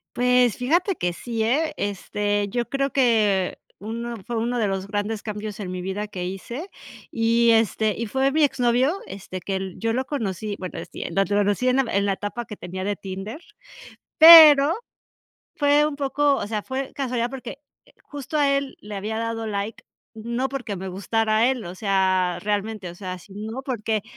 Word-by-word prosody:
Pues 250 -2 +3
fíjate 340 +10 +1
que 175 - -1
sí, 225 +5 -4
¿eh? 300 +7 +1
Este, 205 0 -2
yo 240 +3 -2
creo 275 0 -1
que 215 -8 +2 0.2
uno 235 +3 -5
fue 240 - -3
uno 240 +2 -1
de 215 - +1
los 195 -1 -2
grandes 205 +1 -3
cambios 210 -1 -6
en 190 -3 -5
mi 185 0 -4
vida 190 +3 -4
que 185 -3 -6
hice, 235 - -6 0.4
y, 230 +1 +2
este, 220 -1 +2
y 235 - -2
fue 265 +5 +1
mi 310 +2 +2
exnovio, 255 +1 +2
este, 190 -1 -7
que 195 +2 -3
l 190 -1 -4
yo 225 0 0
lo 255 +3 -1
conocí. 215 - -3
Bueno 185 -2 -6
sí, - - -6
lo 195 +4 +1
conocí 205 +4 +1
en 255 -1 +2
en 200 -1 +1
la 200 - +1
etapa 205 +5 -5
que 210 - -8
tenía 185 0 -6
de 205 +1 -1
Tinder, 195 - -7 0.8
pero, 315 -1 +10 0.8
fue 290 +1 +4
un 300 -1 -2
poco 280 0 +1
O - - -3
sea, 210 0 -3
fue 265 +2 -4
casualidad 250 -4 -1
porque, 260 0 -8 0.3
eh, - - -24
justo 290 +1 -6
a 290 -2 +3
él 275 -1 -4
le 210 0 -8
había 210 +3 -3
dado 225 -1 -3
like. 205 +1 -4 0.3
No, 235 +4 -2
porque 255 -6 -5
me 190 0 -6
gustara 220 +4 +1
él. 255 -4 -2
O 175 +1 -7
sea, 185 -2 +1
realmente, 210 -1 -2
o - - -11
sea, 185 -1 -6
sino 215 +7 -7
porque 225 -5 -2
225 Hz, 185 wpm, -23 LUFS, 200-255 Hz, 0.8 s, pero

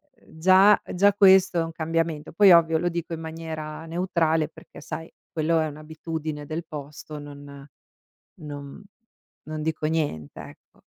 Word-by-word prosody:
ehm, 160 - -19
già 190 +4 +6
già 200 +2 +4
questo 190 -3 +5
è - - +2
un 165 - -5
cambiamento. 165 -1 -2
Poi 200 0 +7
ovvio 165 -1 +4
lo 175 +1 0
dico 170 0 -4
in 160 - -4
maniera 160 -1 -6
neutrale 165 -2 0
perché, - - -14
sai, 160 +1 -7 0.2
quello 160 +1 +1
è 155 - +1
un'abitudine 155 0 -6
del 160 +2 -4
posto, 150 0 -8
non 145 -1 -11 0.7
non 145 +3 -8 0.6
non 155 0 -5
dico 155 -1 -2
niente, 150 - -2
ecco. - - -14
160 Hz, 150 wpm, -25 LUFS, 150-170 Hz, 0.7 s, Poi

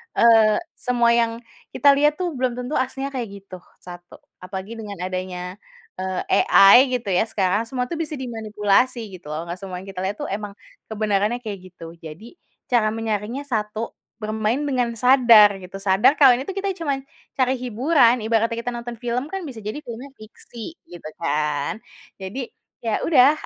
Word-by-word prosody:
eee, 225 -2 +5 0.2
semua 240 -2 +1
yang 235 -1 +3 0.4
kita 285 - +6
lihat 295 0 +3
tuh 360 +1 -2
belum 255 -4 -1
tentu 250 +4 -2
aslinya 270 +2 -3
kayak 250 -4 -4 0.2
gitu, 185 -2 -10 0.2
satu 175 0 -12 0.2
apalagi 190 +5 -7
dengan 210 -2 -7
adanya, 185 0 -5 0.4
eee, 185 -1 -2 0.3
AI 195 +3 +8 0.2
gitu 230 -6 -3
ya 185 +5 +2
sekarang 205 +1 0
semua 250 +1 -2
itu 330 - -3
bisa 310 -1 -3
dimanipulasi 225 -1 0 0.2
gitu 160 - -16
loh 155 +2 -4
nggak 170 +1 -7
semua 190 -1 -7
yang 195 - -14
kita 185 - -8
lihat 190 +2 -2
itu - - -3
emang, 205 0 -5 0.3
kebenarannya 215 +2 -1
kayak 205 -4 -5 0.2
gitu 165 -1 -10
jadi, 175 - -11 0.3
cara 230 -3 +3
menyaringnya 225 +3 -3
satu, 220 -4 -3 0.3
bermain 215 +1 0
dengan 255 -4 0
sadar 230 -5 +6
gitu 185 +1 -11
sadar 200 +8 +4
kalau 280 -3 +7
ini 270 - -6
itu 390 - -5
kita 395 0 -1
cuman, 280 -4 -2 0.3
cari 260 -1 +1
hiburan 250 0 +3
ibaratnya 230 +1 +1
kita 235 +1 -3
nonton 240 0 -6
film 245 +3 -3
kan 385 +3 -5
bisa 265 -8 -8
jadi 215 +8 -6
filmnya 240 +3 -8
fiksi 230 +6 -11
gitu 175 -3 -9
kan 150 +2 -1 0.5
jadi 230 +7 -5 0.4
ya 225 -2 0
udah, 280 -4 +6
225 Hz, 170 wpm, -22 LUFS, 200-255 Hz, 0.5 s, AI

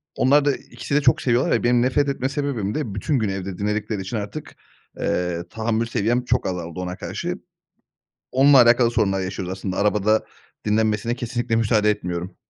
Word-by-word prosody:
onlar 140 +3 +4
da 140 - +2
ikisi 140 - -6
de 150 - +4
çok - - +3
seviyorlar 125 +1 +1
ya, 115 - +1
benim 120 0 +3
nefret 140 +3 +2
etme 135 -1 -1
sebebim 140 -8 -2
de 115 -10 -3
bütün 135 +5 0
gün 105 -3 0
evde 95 -1 -4
dinledikleri 105 0 -2
için 100 +4 -4
artık, 105 +9 -6 0.4
eee, 90 -1 -1
tahammül 115 0 -1
seviyem 120 +2 0
çok 125 +1 +1
azaldı 90 -1 -5
ona 90 0 -4
karşı. - - -4 1.0
Onunla 135 0 +6
alakalı 120 0 +4
sorunlar 95 -4 +1
yaşıyoruz 95 0 -4
aslında 95 0 -4
arabada 105 +1 +2 0.4
dinlenmesine 110 +2 +1
kesinlikle 120 -1 -2
müsaade 105 -2 +3
etmiyorum. 90 -2 -4
110 Hz, 170 wpm, -22 LUFS, 95-125 Hz, 1.0 s, Onunla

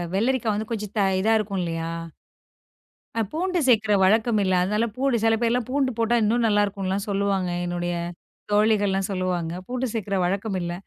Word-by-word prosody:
வெள்ளரிக்கா 235 +2 +1
வந்து 215 +1 -4
கொஞ்சம் 210 -2 -5
த - - +4 0.2
இதா 220 +3 +3
இருக்கும் 200 -2 -3
இல்லயா! 165 -1 -3 1.2
அ 225 - +1
பூண்டு 360 +3 0
சேக்கற 220 -4 +4
வழக்கம் 220 +3 +3
இல்ல. 190 -1 +1
அதனால 210 +5 +1
பூண்டு 265 -2 +1
சில 225 0 +4
பேர்லாம் 235 0 +1
பூண்டு 270 -1 +1
போட்டா 230 +1 +2
இன்னும் 230 +3 +2
நல்லாருக்குன்லாம் 200 -2 0
சொல்லுவாங்க. 195 -2 0 0.2
என்னுடைய 175 0 -2 0.6
தோழிகள்லாம் 205 -2 +2
சொல்லுவாங்க. 180 -3 -2
பூண்டு 255 +1 -2
சேர்க்கிற 200 -3 -2
வழக்கம் 195 +2 -1
இல்ல. 175 0 -3
210 Hz, 155 wpm, -24 LUFS, 190-230 Hz, 1.2 s, த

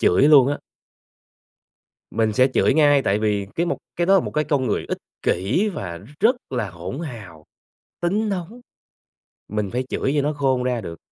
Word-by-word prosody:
chửi 90 - +4
luôn 140 -3 +7
á. 145 - -1 1.5
Mình 110 -1 +1
sẽ 130 +4 +4
chửi - - +3
ngay, 145 -2 +5
tại 100 -4 +1
vì 105 -2 0
cái 170 - +1
một - - -1 0.2
cái 175 - +1
đó 195 0 +6
một - - -4
cái 150 - +1
con 140 -4 0
người 105 - -1
ích - - -2 0.2
kỷ 115 - +1
và 90 - -5
nó 95 - -14
rất 235 +6 +4
là 120 -6 -2
hỗn 90 - -7
hào, 105 - -9 0.6
tính 205 +5 0
nóng. 195 +5 -4 0.9
Mình 105 -2 -2
phải 125 +1 -2
chửi 135 - -1
cho 145 - +3
nó 150 +2 0
khôn 135 -3 +1
ra 125 -2 -1
được, 85 -6 -8
130 Hz, 190 wpm, -22 LUFS, 105-155 Hz, 1.5 s, luôn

